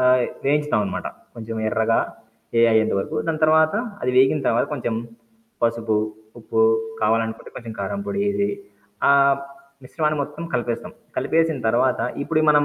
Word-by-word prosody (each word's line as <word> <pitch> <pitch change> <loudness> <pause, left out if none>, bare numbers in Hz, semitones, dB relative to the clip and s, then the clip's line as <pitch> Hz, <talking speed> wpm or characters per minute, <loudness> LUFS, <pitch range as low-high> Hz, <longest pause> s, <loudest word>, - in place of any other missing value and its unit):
ఆహ్ 125 0 +5 0.2
వేయించుతామనమాట. 110 -11 0 0.3
కొంచెం 115 -1 -6
ఎర్రగా 110 +1 +2 0.6
ఎ - - +6
అయియ్యేంత 110 0 +3
వరకు. 150 +10 -3
దాని 160 -1 -1
తర్వాత 155 +1 +4 0.3
అది 125 - +1
వేగిన 135 +3 +5
తర్వాత 115 - +3
కొంచెం 120 -5 -2 0.7
పసుపు 115 -2 +1 0.4
ఉప్పు 450 +1 -1 0.4
కావాలనుకుంటే 115 0 0
కొంచెం 115 -2 -7
కారంపొడేసి 200 0 -1 0.6
ఆ - - +7 0.7
మిశ్రమాన్ని 155 +2 -1
మొత్తం 150 +3 -7
కలిపేస్తాం. 120 -1 -2 0.2
కలిపేసిన 160 -2 +1
తర్వాత 125 +2 +2 0.2
ఇప్పుడు 155 +1 +1
మనం 150 -1 +5
130 Hz, 125 wpm, -22 LUFS, 115-155 Hz, 0.7 s, ఆ